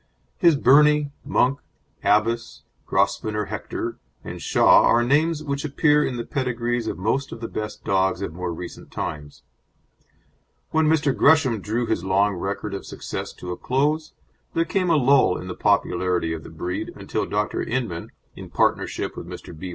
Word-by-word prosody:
His 170 -3 +5
Birnie, 150 +2 +5
Monk, 135 +3 +1 0.4
Abbess, 115 +3 +1 0.2
Grosvenor 105 -1 0
Hector, 105 - -4 0.2
and - - -7
Shah - - +5
are 120 - +4
names 155 +5 +2
which 140 -1 -3
appear 150 0 +3
in 125 - -2
the 120 - -4
pedigrees 120 -3 -2
of - - -3
most 115 +9 -1
of - - -7
the 115 - -4
best 105 -1 -6
dogs 95 0 +1
of 85 - -4
more 90 0 -4
recent 85 +1 -8
times. 75 -1 -6 1.3
When 160 -1 +3
Mr. 150 -3 +2
Gresham 140 -8 +4
drew 115 +5 -1
his 110 -6 -1
long 100 +2 +2
record 100 +2 -4
of 100 - -5
success - - -6
to 90 - -7
a 90 - -4
close 150 +4 0 0.4
there 165 - +2
came 185 0 0
a 165 - +4
lull 135 -7 +4
in - - -7
the 90 - -4
popularity 90 -4 +1
of 80 - -5
the - - -11
breed 90 +3 -4
until - - -3
Dr. - - -1
Inman, 115 -9 -3 0.2
in - - -10
partnership - - 0
with - - -8
Mr. 85 - -9
B. 90 +4 -7
120 Hz, 165 wpm, -23 LUFS, 95-145 Hz, 1.3 s, His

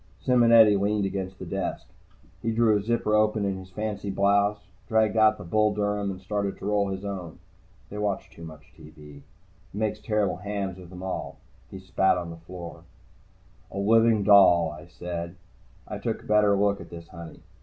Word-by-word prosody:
Simonetti 115 -4 +5
leaned 100 +1 0
against 95 -1 -4
the - - -8
desk. - - -4 0.6
He 115 - -2
drew 110 -1 +3
a 105 - +1
zipper 115 0 -1
open 105 -1 +2
in 95 -1 -2
his 95 0 -12
fancy 105 +1 -4
blouse, 100 +1 +2 0.3
dragged 110 -1 +2
out 110 -1 +4
the - - -9
Bull 105 +4 +1
Durham 105 -1 -1
and 95 -1 -6
started 100 +1 -3
to - - -9
roll 105 -1 +1
his 95 +1 -5
own. 90 -5 -6 0.5
They 105 - -6
watch 100 -2 -2
too 85 - -13
much 80 -2 -12
TV. 75 -1 -14
It 70 - -16 0.5
makes 110 0 -1
terrible 105 -3 -1
hams 100 -2 -4
of 90 -2 -12
them 90 0 -10
all. 95 - -5 0.3
He - - -9
spat 95 0 +1
on 85 -1 -5
the 85 - -9
floor. 85 0 -10 0.9
"A - - -9
living 110 +1 +3
doll," 90 -5 +6
I 75 +2 -11
said. 85 0 -6 0.5
I - - -6
took - - -3
a - - -17
better 105 -1 +3
look 100 0 +1
at - - -11
this 85 -1 -11
honey. 85 -2 -11
100 Hz, 185 wpm, -26 LUFS, 90-105 Hz, 0.9 s, doll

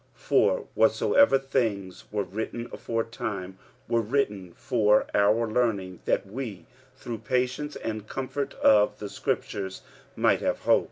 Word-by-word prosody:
45:015:004 - - -21
For - - +3
whatsoever 280 - +4
things 115 -9 -2
were 105 -1 0
written 110 +5 -5
aforetime 105 -5 -4 0.3
were 115 0 +2
written 105 -6 -1
for 105 -5 +3
our 105 +3 +3
learning, 110 -6 0
that - - +1
we 100 -5 -6 0.3
through 120 -4 -6
patience 130 +5 -1
and 110 -1 -5
comfort 135 +2 -4
of 105 -1 +4
the 105 - -6
scriptures 95 -1 -3 0.3
might - - +3
have - - -1
hope. - - +5
110 Hz, 130 wpm, -27 LUFS, 100-125 Hz, 0.3 s, hope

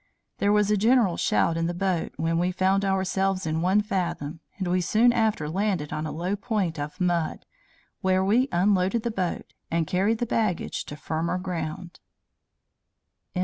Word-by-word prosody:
There 200 - +3
was 210 0 +3
a 210 - +3
general 220 -3 +3
shout 165 - +1
in 165 0 0
the 175 - -3
boat 185 -2 -1
when 165 +1 0
we 180 +1 +1
found 190 +2 +2
ourselves 190 0 0
in 160 0 -1
one 190 +4 +3
fathom, 180 -7 -3 0.2
and 190 -3 -2
we 180 +1 +1
soon 230 +7 +4
after 220 -9 +1
landed 180 -3 -1
on 155 0 -3
a - - -4
low 180 +5 -2
point 205 -7 -2
of 150 +6 -5
mud, 175 -3 0 0.6
where 190 0 +2
we 245 +7 +3
unloaded 190 +4 +2
the 235 - -1
boat, 185 -5 -3 0.2
and 165 -1 +1
carried 195 +7 +1
the 240 - -1
baggage 215 -6 -1
to 145 - -7
firmer 165 +3 -2
ground." 175 -1 -5
185 Hz, 170 wpm, -26 LUFS, 170-205 Hz, 0.6 s, soon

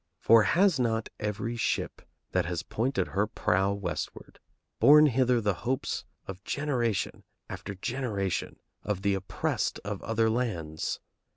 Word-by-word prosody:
For 115 0 +6
has 170 - +3
not 115 -2 0
every 105 +3 -2
ship 115 - -1 0.3
that - - +1
has 85 -2 -2
pointed 125 +9 -1
her 105 +2 +1
prow 95 -2 +1
westward 100 -1 -5 0.4
borne 150 +6 +8
hither 125 -3 +3
the 105 -3 +1
hopes 125 +8 -2 0.2
of 95 0 -8
generation 125 -8 -1 0.2
after 100 - -6
generation 105 -3 -2 0.2
of 95 -2 -3
the 100 0 +3
oppressed 95 -1 -2
of 100 -1 -4
other 115 0 +1
lands? 95 -10 -2
110 Hz, 130 wpm, -29 LUFS, 100-125 Hz, 0.4 s, borne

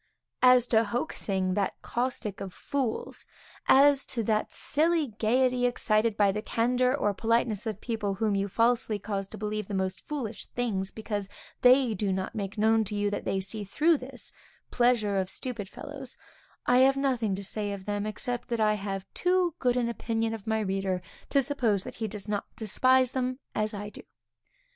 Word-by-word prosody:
As 250 -1 +7
to 225 -1 +4
hoaxing, 200 -5 -1
that 200 0 -1
caustic 240 -4 -2
of 190 -2 -6
fools; 265 -5 -3 0.4
as 280 0 +6
to 235 -3 -1
that 215 0 0
silly 315 -1 +1
gaiety, 250 +2 +3
excited 220 -2 +1
by 200 -2 +4
the 210 +2 -3
candor 250 +4 +1
or 205 -7 +1
politeness 225 0 +1
of 215 -2 -3
people 215 -5 -2
whom 215 +1 0
you 200 0 0
falsely 230 +1 +2
cause 200 -1 -3
to - - -9
believe 215 -1 -3
the 205 - -4
most 190 -1 -2
foolish 245 -8 -5
things, 205 -6 -2
because 205 -2 -4 0.3
they 250 -1 +6
do 200 -1 -1
not 190 0 -2
make 200 0 -4
known 220 +1 +4
to 210 +1 -3
you 205 0 0
that 205 - -3
they 195 - 0
see 205 +3 -4
through 305 - +3
this 255 0 -6 0.4
pleasure 235 -5 +2
of 190 -1 0
stupid 230 -6 -4
fellows, 275 +1 -8 0.5
I 245 0 +5
have 270 +1 +5
nothing 245 -7 +1
to 200 - -6
say 205 +1 -2
of 195 -1 -6
them, 205 0 -2
except 245 +3 -3
that 235 -2 -2
I 215 -1 +4
have 195 -2 -4
too 360 -1 +2
good 250 -1 +2
an 240 -1 +1
opinion 225 -1 -1
of 220 -2 -8
my 220 0 +1
reader 190 -2 -1 0.3
to 275 -1 +3
suppose 235 -8 0
that - - -9
he 220 - 0
does 210 0 -8
not 205 -1 -1
despise 255 +4 +3
them 255 -1 -1 0.2
as 215 0 0
I 205 -1 -5
do. - - -10
220 Hz, 185 wpm, -28 LUFS, 205-250 Hz, 0.5 s, As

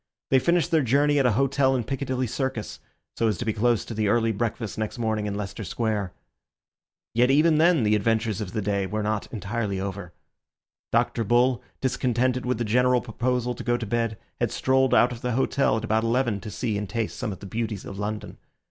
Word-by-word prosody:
They 135 - +6
finished 170 +4 +1
their 160 -2 +4
journey 145 +3 +3
at 135 - +4
an 120 - +2
hotel 135 +2 +2
in 125 - 0
Piccadilly 130 0 -2
Circus, 125 -2 -3 0.4
so 115 - +1
as 105 -4 0
to 120 - -4
be 110 - 0
close 115 +1 +1
to - - -6
the 110 -1 0
early 115 +1 +2
breakfast 110 0 -3
next 110 +3 -3
morning 110 -2 -1
in 100 - -3
Leicester 100 +1 -5
Square. 105 -2 -2 1.0
Yet 120 +2 +3
even 155 +3 +4
then 165 -5 +4
the 105 0 +3
adventures 110 0 0
of 90 -4 -5
the 110 - -2
day 100 -1 0
were 105 +2 -2
not 105 0 -1
entirely 105 -1 -3
over. 95 -2 -5 0.8
Dr. 115 - +1
Bull, 120 +3 +3 0.2
discontented 125 -1 0
with 125 - 0
the 120 - -1
general 125 +3 +3
proposal 125 +1 -1
to - - -8
go 120 0 +1
to 120 - -4
bed, 115 0 -1 0.2
had - - 0
strolled 130 -1 +2
out 125 - +5
of 120 -1 -7
the 125 -1 -1
hotel 135 -2 +2
at 110 - -4
about 110 0 +1
eleven 115 -2 +1
to 110 - -7
see 105 -1 -2
and 105 -2 -5
taste 115 0 -2
some 105 - -3
of 95 - -6
the - - -10
beauties 110 -1 -3
of 100 - -7
London. 105 0 -4
115 Hz, 210 wpm, -25 LUFS, 105-125 Hz, 1.0 s, They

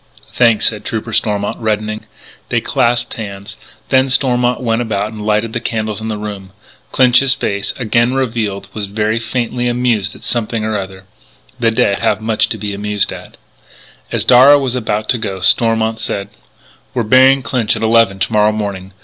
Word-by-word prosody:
"Thanks," 115 -3 +3
said 110 -2 0
Trooper 110 0 -4
Stormont, 105 -1 -1
reddening. 110 -1 -2 0.4
They - - +1
clasped 120 0 0
hands. 100 -2 -8 0.3
Then 130 0 +3
Stormont 125 -2 +1
went 115 -2 0
about 105 -2 -2
and 105 -1 -7
lighted 110 +1 0
the 120 - -1
candles 110 -2 -3
in 110 - -4
the 110 -1 -3
room. 100 -2 -7 0.4
Clinch's 130 +1 +4
face, 100 -6 -2
again 120 +1 +1
revealed, 115 -6 -2
was 105 -2 -3
still 105 +3 -1
faintly 120 +1 -2
amused 120 -5 0
at - - -15
something 115 -2 -2
or 110 0 -2
other. 95 -1 -6 0.6
The 115 -2 +3
dead 100 -3 +1
have - - +1
much 110 0 0
to 115 - -3
be 105 0 -4
amused 105 0 -1
at. - - -11 0.7
As - - -1
Darragh 130 +4 +7
was 130 -3 -2
about 110 -3 -2
to 120 - +2
go, 100 -4 -4
Stormont 110 +3 +2
said: 100 -3 -4 0.7
"We're 120 - +1
burying 130 +4 +5
Clinch 115 -5 0
at 110 - -4
eleven 110 -3 +3
to 105 - -2
morrow 105 0 +4
morning. 100 -3 -5
110 Hz, 175 wpm, -15 LUFS, 105-120 Hz, 0.7 s, Darragh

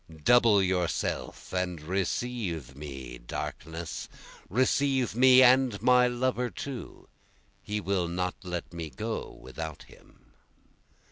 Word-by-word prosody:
Double 115 -1 +5
yourself 90 -1 -2
and 90 -2 -1
receive 90 - -3
me 65 -4 -8
darkness, 80 +6 -6 0.4
Receive 130 +3 +2
me 130 +2 +7
and 125 -4 +5
my 125 0 +5
lover 125 0 0
too, 130 +1 -7 0.5
he 105 0 -3
will 95 -3 0
not 90 +1 -2
let 90 -2 -5
me 85 -2 -5
go 110 - -4
without 80 +3 -7
him. - - -21
95 Hz, 110 wpm, -29 LUFS, 85-125 Hz, 0.5 s, me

